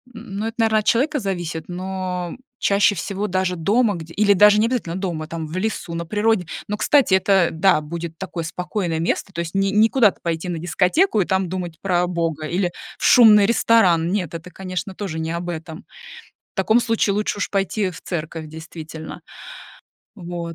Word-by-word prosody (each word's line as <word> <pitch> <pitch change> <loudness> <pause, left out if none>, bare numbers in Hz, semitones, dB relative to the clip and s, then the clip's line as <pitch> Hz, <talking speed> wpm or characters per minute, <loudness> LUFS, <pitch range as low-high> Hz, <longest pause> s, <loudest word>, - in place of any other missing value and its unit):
н 220 -4 -8
ну, 215 - -2
это, 225 - -6
наверно, 220 -2 +3
от 210 - -5
человека 290 +6 +2
зависит, 175 -6 -4
но, 185 -1 -4
м, - - -10 0.2
чаще 200 +1 +3
всего 200 +3 -3
даже 185 -1 0
дома 205 +6 +2
где 165 -1 -9
или 205 -1 +4
даже 210 +2 +6
не 215 - +3
обязательно 230 -9 -2
дома, 175 -5 -3
там 165 0 -5
в 155 - -8
лесу, 195 -3 -3
на 170 0 -4
природе. 210 -2 +1 0.2
Но, 210 - -3
кстати, 275 -3 +3
это, 190 -2 +4
э, - - -9
да, 160 -1 +3
будет 165 +1 -6
такое 180 -2 -5
спокойное 175 0 -3
место, 170 +3 -1
то 170 - -5
есть 170 -1 -6
не 195 0 +1
не 215 +2 +4
куда-то 225 -7 +3
пойти 170 +1 -2
на 170 - -3
дискотеку 190 - +2
и - - 0
там 190 -1 0
думать 175 -3 -5
про, 180 -2 +1
а, - - 0
Бога 165 -3 -2
или 175 +2 -1 0.3
в - - -9
шумный 215 -4 +7
ресторан. 185 -7 +3
Нет, 185 -6 -2
это, 165 +2 -7
конечно, 185 0 -5
тоже 180 -6 -4
не 160 0 -3
об 170 +1 -4
этом. 160 -1 -7 0.7
В - - -65
таком 220 +4 +3
случае 225 -3 +1
лучше 210 0 -1
уж - - -2
пойти, 200 +1 0
э, - - -1
в 175 - -11
церковь, 160 -2 -5
действительно. 160 0 -9 0.9
Вот. 170 -3 -6
185 Hz, 200 wpm, -21 LUFS, 170-210 Hz, 0.9 s, шумный